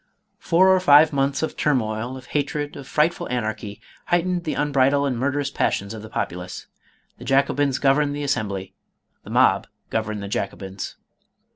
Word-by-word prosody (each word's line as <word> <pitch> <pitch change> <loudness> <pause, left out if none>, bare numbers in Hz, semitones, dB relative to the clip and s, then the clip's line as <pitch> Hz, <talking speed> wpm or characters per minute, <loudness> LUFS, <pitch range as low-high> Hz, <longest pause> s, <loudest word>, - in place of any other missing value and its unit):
Four 185 +3 +4
or 185 - +4
five 155 -3 +6
months 140 +1 0
of 160 - -2
turmoil, 120 -3 -1
of 130 - -12
hatred, 145 +1 -2
of 140 -2 -9
fright 155 +4 +2
ful - - -7
anarchy, 110 -4 -3 0.3
heightened 175 0 0
the 155 - -2
unbridled 140 -1 +2
and 135 -3 0
murderous 140 +3 -1
passions 100 +2 -1
of 110 - -7
the 110 - -10
populace. 90 +1 -4 0.5
The - - -9
Jacobins 140 0 +2
governed 145 +1 +2
the 145 - -4
Assembly, 100 -9 -2 0.5
the - - -12
mob - - +3 0.2
governed 110 -2 -2
the - - -5
Jacobins. 100 -1 -4
135 Hz, 160 wpm, -23 LUFS, 110-145 Hz, 0.5 s, five